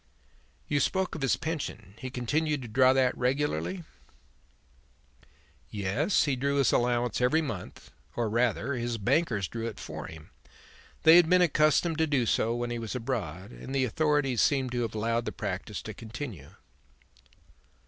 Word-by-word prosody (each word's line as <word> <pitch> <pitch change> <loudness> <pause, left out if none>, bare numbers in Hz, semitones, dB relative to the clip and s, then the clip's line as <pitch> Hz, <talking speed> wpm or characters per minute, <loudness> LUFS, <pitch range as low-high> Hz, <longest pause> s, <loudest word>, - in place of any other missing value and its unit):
"You 145 - +1
spoke 190 +5 0
of 160 - -6
his 135 - +2
pension. 145 - -5
He 130 - -5
continued 145 +4 -1
to - - -7
draw 130 +3 +4
that 130 -1 +2
regularly?" 135 - -1 1.9
"Yes; 105 - +1
he 145 -3 0
drew 140 +2 0
his 140 -3 +3
allowance 120 -1 +1
every 155 +6 +3
month, 105 -11 -7 0.2
or 120 -1 0
rather, 120 +4 0
his 120 -2 -2
bankers 110 - +1
drew 115 +3 -4
it 115 - -7
for - - -7
him. 80 -1 -12 0.7
They 160 +2 +9
had 175 -2 +5
been 180 0 +5
accustomed 155 +1 +2
to 160 - +3
do 140 -5 +1
so 115 +1 +1
when 120 0 -3
he 120 - -3
was 115 +1 -5
abroad, 110 - -4
and 135 +2 -7
the 130 -1 +2
authorities 145 -2 +1
seem 135 -3 +2
to 120 -1 -1
have 115 -2 -3
allowed 115 +2 0
the - - -2
practice - - -5
to - - -6
continue." 110 - -8
125 Hz, 160 wpm, -28 LUFS, 115-145 Hz, 1.9 s, They